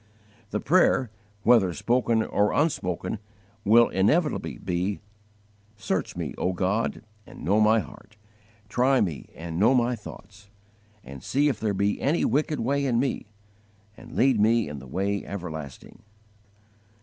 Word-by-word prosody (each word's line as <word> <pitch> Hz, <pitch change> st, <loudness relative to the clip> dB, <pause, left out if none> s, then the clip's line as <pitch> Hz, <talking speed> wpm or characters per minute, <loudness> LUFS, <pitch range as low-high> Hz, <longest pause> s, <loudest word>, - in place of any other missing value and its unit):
The 105 Hz, -, -2 dB
prayer, 135 Hz, -, +3 dB, 0.3 s
whether 110 Hz, -6 st, +5 dB
spoken 115 Hz, -, +1 dB
or 105 Hz, -1 st, +1 dB
unspoken, 100 Hz, -, -1 dB, 0.4 s
will 115 Hz, +3 st, +6 dB
inevitably 150 Hz, -, +1 dB
be: 95 Hz, +2 st, -2 dB, 0.8 s
"Search -, -, -3 dB
me, -, -, -4 dB
O 90 Hz, -, 0 dB
God, 95 Hz, +5 st, -1 dB, 0.2 s
and -, -, -12 dB
know 100 Hz, +5 st, +3 dB
my 110 Hz, +1 st, +4 dB
heart, 105 Hz, +1 st, -14 dB, 0.5 s
Try 130 Hz, +4 st, +2 dB
me, 85 Hz, -8 st, -2 dB
and 85 Hz, 0 st, -5 dB
know 115 Hz, +6 st, +5 dB
my 120 Hz, 0 st, +2 dB
thoughts; 100 Hz, -1 st, -13 dB, 0.5 s
And 70 Hz, 0 st, -10 dB
see 145 Hz, -, +1 dB
if 125 Hz, -7 st, -3 dB
there 105 Hz, -2 st, -1 dB
be 100 Hz, +1 st, 0 dB
any 150 Hz, +5 st, +1 dB
wicked 150 Hz, +1 st, 0 dB
way 140 Hz, +4 st, 0 dB
in 125 Hz, -4 st, +1 dB
me, 130 Hz, -4 st, -2 dB, 0.7 s
And 115 Hz, +2 st, -13 dB
lead 130 Hz, -3 st, +3 dB
me 115 Hz, +1 st, +3 dB
in 75 Hz, -1 st, -6 dB
the 65 Hz, -, -12 dB
way 100 Hz, +7 st, -2 dB
everlasting!" 80 Hz, -7 st, -8 dB
105 Hz, 140 wpm, -26 LUFS, 95-125 Hz, 0.8 s, will